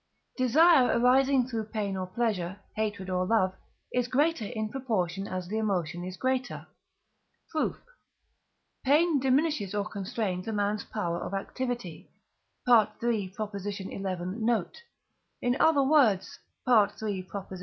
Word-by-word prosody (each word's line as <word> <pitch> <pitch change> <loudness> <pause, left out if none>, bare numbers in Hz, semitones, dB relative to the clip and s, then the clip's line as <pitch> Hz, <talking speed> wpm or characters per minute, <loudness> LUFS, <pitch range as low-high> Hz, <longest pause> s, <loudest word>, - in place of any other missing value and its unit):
Desire 275 +2 +5
arising 260 +1 +4
through 225 -4 -3
pain 210 -3 -3
or 185 -1 -3
pleasure, 195 -3 -2 0.2
hatred 210 -3 -2
or 185 -1 0
love, 190 -2 +2 0.4
is 250 -1 +1
greater 285 -1 +1
in 220 0 -3
proportion 200 -7 -2
as 185 -1 -4
the 215 +4 -2
emotion 180 -5 -1
is 185 0 -6
greater. 260 -1 -2 0.9
Proof. 315 - -1 1.1
Pain 300 +3 +4
diminishes 265 - +1
or 205 0 -1
constrains 195 -2 -3
a 225 - -2
man's 205 0 -1
power 175 -5 -2
of 195 - -4
activity 240 -3 -4 0.6
(III. 220 -3 +3 0.4
xi. 200 -1 -5 0.2
note), 195 - -2 0.6
in 245 0 +1
other 305 -4 +5
words 265 -9 +3 0.3
(III. 210 -4 +2
220 Hz, 120 wpm, -28 LUFS, 190-255 Hz, 1.1 s, Desire